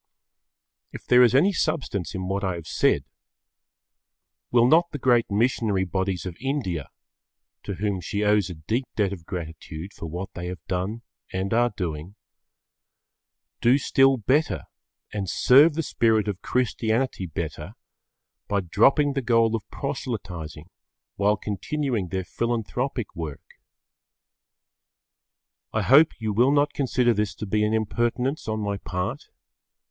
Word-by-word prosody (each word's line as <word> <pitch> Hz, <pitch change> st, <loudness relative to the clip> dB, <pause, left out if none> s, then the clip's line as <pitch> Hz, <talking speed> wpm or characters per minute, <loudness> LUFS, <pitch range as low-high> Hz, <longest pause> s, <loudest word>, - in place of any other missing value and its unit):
If -, -, -10 dB
there 125 Hz, 0 st, +6 dB
is 125 Hz, -1 st, +5 dB
any 185 Hz, +9 st, +4 dB
substance 110 Hz, -, -2 dB
in 95 Hz, 0 st, -3 dB
what 100 Hz, +1 st, -2 dB
I 95 Hz, -2 st, -1 dB
have 85 Hz, -2 st, -8 dB
said, -, -, +1 dB, 1.4 s
will 120 Hz, -1 st, +4 dB
not 165 Hz, +6 st, +4 dB
the 145 Hz, -, -5 dB
great 120 Hz, -3 st, +3 dB
missionary 105 Hz, -2 st, +1 dB
bodies 95 Hz, 0 st, -2 dB
of 90 Hz, -2 st, -5 dB
India, 120 Hz, -, -2 dB, 0.7 s
to 100 Hz, -, -5 dB
whom 100 Hz, 0 st, -2 dB
she 100 Hz, +5 st, -2 dB
owes 105 Hz, -2 st, +3 dB
a 90 Hz, -, -6 dB
deep 110 Hz, -, -2 dB
debt 100 Hz, -2 st, +1 dB
of 85 Hz, -4 st, -10 dB
gratitude 80 Hz, 0 st, -7 dB
for 85 Hz, -, -7 dB
what 90 Hz, +4 st, -6 dB
they 90 Hz, 0 st, -5 dB
have 90 Hz, -1 st, -7 dB
done 100 Hz, +5 st, -3 dB, 0.3 s
and 95 Hz, +2 st, -2 dB
are 120 Hz, +1 st, +3 dB
doing, 85 Hz, +1 st, -4 dB, 1.5 s
do 120 Hz, +3 st, +5 dB
still 135 Hz, -1 st, +3 dB
better 135 Hz, +8 st, +1 dB, 0.5 s
and 100 Hz, -3 st, -3 dB
serve 145 Hz, +5 st, +6 dB
the 165 Hz, -, -1 dB
spirit 110 Hz, -6 st, +2 dB
of 100 Hz, -1 st, -3 dB
Christianity 120 Hz, -3 st, 0 dB
better 80 Hz, -, -5 dB, 0.7 s
by 100 Hz, -1 st, 0 dB
dropping 135 Hz, -, +3 dB
the 135 Hz, -, -1 dB
goal 115 Hz, -2 st, +3 dB
of 110 Hz, -, -6 dB
proselytising 90 Hz, -, -5 dB, 0.4 s
while 105 Hz, +1 st, +2 dB
continuing 110 Hz, +1 st, -2 dB
their 95 Hz, +1 st, -3 dB
philanthropic 120 Hz, +2 st, -2 dB
work? 80 Hz, -4 st, -6 dB, 2.3 s
I -, -, +1 dB
hope 145 Hz, +3 st, +5 dB
you 110 Hz, -2 st, -2 dB
will 120 Hz, +6 st, +4 dB
not 145 Hz, 0 st, +2 dB
consider 125 Hz, -3 st, +2 dB
this 105 Hz, -1 st, -1 dB
to -, -, -5 dB
be 105 Hz, +2 st, +1 dB
an 105 Hz, +1 st, +1 dB
impertinence 120 Hz, +6 st, -1 dB
on 110 Hz, 0 st, -1 dB
my 100 Hz, -1 st, -2 dB
part. 90 Hz, -1 st, -4 dB
105 Hz, 140 wpm, -25 LUFS, 95-125 Hz, 2.3 s, there